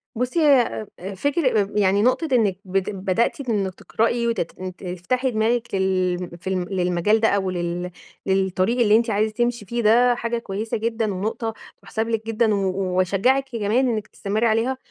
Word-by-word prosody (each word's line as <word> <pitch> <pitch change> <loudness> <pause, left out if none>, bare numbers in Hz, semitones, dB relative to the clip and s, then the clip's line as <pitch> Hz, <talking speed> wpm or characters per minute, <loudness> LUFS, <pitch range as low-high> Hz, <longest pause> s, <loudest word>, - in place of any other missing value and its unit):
بُصي 250 +8 -1
هيّ 270 -8 +3
أ 190 +3 -6
فكر 270 - +1
أ 195 - -1
يعني 200 -1 +3
نقطة 255 +8 +2
إنّك 210 -6 +2
بت 190 0 -1
بدأتِ 195 +6 0
إنِك 195 -4 -1
تقرئي 235 +3 0
وتت 215 -8 -2
إن 185 -1 -6
تفتحي 190 +9 -2
دماغِك 225 +1 0
لل 185 -2 0
في - - -9
ال 185 +1 -3
للمجال 180 +4 +2
ده 225 - +3
أو 195 -3 +1
لل 175 0 -3 0.3
للطريق 190 +4 +1
اللي 215 -3 +5
أنتِ 230 +1 +2
عايزة 215 +1 +1
تمشي 240 -1 -1
فيه 235 +4 -2
ده 240 +3 +5
حاجة 235 0 -2
كويّسة 220 0 -3
جدًا 225 -1 -1
ونقطة 220 +4 -3 0.3
تُحسب 220 0 -3
لِك 225 -1 -2
جدًا 225 -1 +2
و - - +1 0.4
واشجّعِك 245 +9 +2
كمان 230 +3 +1
إنّك 215 -2 -2
تستمري 215 +3 -2
عليها، 230 +4 +1
215 Hz, 175 wpm, -22 LUFS, 190-235 Hz, 0.4 s, اللي